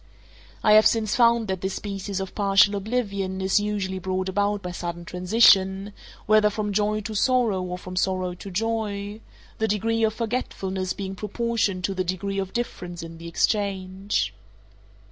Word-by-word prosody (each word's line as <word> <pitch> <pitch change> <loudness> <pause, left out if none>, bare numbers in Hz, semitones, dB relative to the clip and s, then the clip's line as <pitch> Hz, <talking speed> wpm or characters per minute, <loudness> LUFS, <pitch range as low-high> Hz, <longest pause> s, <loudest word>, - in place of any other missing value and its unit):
I 210 - +6
have 215 0 +8
since 220 -2 +1
found 235 -2 +4
that 190 -2 -2
this 190 0 -2
species 195 -1 -4
of 190 -1 -5
partial 200 0 +4
oblivion 200 -3 -2
is 190 +2 +2
usually 200 -2 -2
brought 185 0 -2
about 205 +1 0
by 180 - -4
sudden 175 -1 -5
transition, 190 +1 +4 0.3
whether 215 0 +5
from 210 0 -3
joy 210 +1 +1
to 215 +1 -6
sorrow 225 -3 +2
or 180 0 -4
from 185 0 -8
sorrow 185 -1 0
to 180 +3 -9
joy—the 215 +1 -3
degree 225 +2 0
of 220 0 +2
forgetfulness 195 -5 -2
being 195 -1 -5
proportioned 210 -2 -1
to 195 - 0
the 185 -1 -1
degree 195 +2 -2
of 190 -1 -3
difference 180 -7 -4
in 165 0 -9
the 170 - -8
exchange. 195 +1 -1
200 Hz, 160 wpm, -25 LUFS, 185-215 Hz, 0.3 s, have